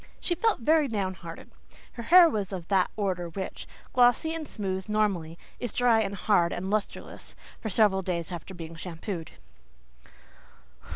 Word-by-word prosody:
She 350 - 0
felt 405 - +1
very 305 +4 +4
down 200 -5 -2
hearted; 170 -3 -10 0.4
her 235 - -8
hair 345 +8 +8
was 210 - -2
of 180 -3 -6
that 190 -2 +3
order 185 -4 -2
which, 190 +2 -6 0.3
glossy 250 +5 +4
and 320 -2 -5
smooth 190 -1 -4
normally, 195 -7 0 0.2
is 245 - -3
dry 240 -2 +4
and 200 -1 -2
harsh 185 -4 +2
and 190 +2 -4
lustreless 215 -1 -4 0.2
for 220 - -4
several 200 -1 +3
days 175 -2 -3
after 175 +2 -7
being 165 -1 -8
shampooed. 165 +1 -6
195 Hz, 155 wpm, -28 LUFS, 180-235 Hz, 0.4 s, hair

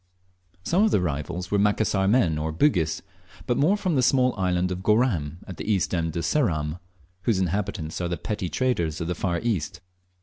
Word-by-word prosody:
Some 180 - +2
of 220 - +4
the - - +3
arrivals 85 +2 -3
were 100 - +2
Macassar 100 -1 +2
men 95 -9 +3
or 80 +1 -2
Bugis, 85 - +1 0.4
but 120 - +1
more 170 +11 +3
from 185 -4 -1
the 135 - +3
small 125 0 +3
island 90 -1 0
of 90 0 -3
Goram, 95 - +1
at 95 - -9
the 110 - -2
east 90 -7 +1
end 80 -2 -1
of 85 - -1
Ceram, 80 - 0 0.5
whose 115 -5 +2
inhabitants 95 -3 -2
are 90 - -1
the 85 - -2
petty 105 -4 -3
traders 85 - 0
of 80 - -3
the 90 - 0
far 85 0 -1
East. 110 -10 -2
95 Hz, 195 wpm, -25 LUFS, 85-115 Hz, 0.5 s, of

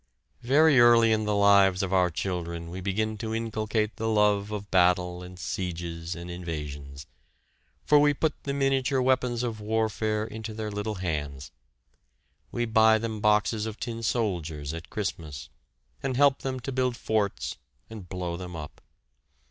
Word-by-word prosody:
Very 145 +2 +5
early 120 -1 +6
in 110 -1 +1
the 105 -1 0
lives 100 -2 +5
of 95 0 -2
our 90 -1 +4
children 85 -1 -4
we 95 +2 -6
begin 110 +3 -1
to 110 -1 -3
inculcate 110 -1 -2
the 110 0 -1
love 105 -1 +2
of 105 -1 -6
battle 90 -1 +2
and 90 0 -10
sieges 85 -2 -4
and 85 0 -8
invasions, 75 -5 -6 0.8
for 150 - +6
we 145 0 +5
put 155 +2 0
the 140 - -3
miniature 135 -1 +1
weapons 125 -2 +1
of 115 -3 -3
warfare 110 0 0
into 110 0 -7
their 110 -1 -4
little 105 +1 -3
hands. 75 -7 -4 1.0
We 120 - -1
buy 110 -1 +5
them 110 -1 -4
boxes 105 +1 +2
of 110 0 -7
tin 115 -1 -4
soldiers 85 - -2
at 85 0 -8
Christmas, 85 - -5 0.5
and 130 -2 -2
help 140 -1 +4
them 130 -1 -3
to 125 - -4
build 125 -2 0
forts 105 -3 -1 0.3
and 105 -6 -10
blow 90 -2 -4
them 90 -1 -7
up. 75 -2 -8
105 Hz, 155 wpm, -27 LUFS, 90-115 Hz, 1.0 s, early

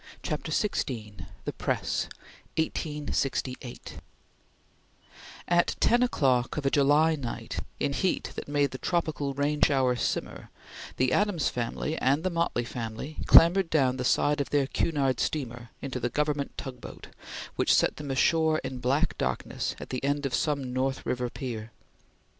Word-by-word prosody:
CHAPTER - - -3
XVI 105 - -2 0.2
THE - - -2
PRESS - - -1 0.5
(1868) 145 -5 -2 1.5
AT 175 0 +3
ten 240 +1 +4
o'clock 135 - +2
of 145 - -2
a 135 - +3
July 145 +3 +4
night, 130 -6 -4 0.2
in 140 - 0
heat 185 +6 0
that - - -6
made 145 -1 +1
the 130 - -6
tropical 155 -5 -1
rain 145 +1 0
shower 130 -3 +3
simmer, 120 - -3 0.5
the 130 0 +2
Adams 200 -9 +2
family 125 +6 -3
and 140 +4 +2
the 185 - 0
Motley 170 -8 0
family 115 +5 -6
clambered 175 +1 +7
down 130 -5 +2
the 125 - -2
side 145 +3 +2
of 140 - -3
their 145 -2 +2
Cunard 135 -3 0
steamer 120 -5 -2
into 130 -2 -3
the 120 0 -1
government 150 +1 -1
tugboat, 130 -3 -8 0.5
which - - +2
set - - +3
them 150 -2 -6
ashore 160 +3 +3
in 130 -1 -5
black 130 +4 +1
darkness - - -2
at - - -8
the 130 0 -3
end 145 +1 0
of 135 - -2
some 135 0 0
North 130 +1 -1
River 125 -1 -1
pier. 120 -5 -5
140 Hz, 145 wpm, -28 LUFS, 125-150 Hz, 1.5 s, clambered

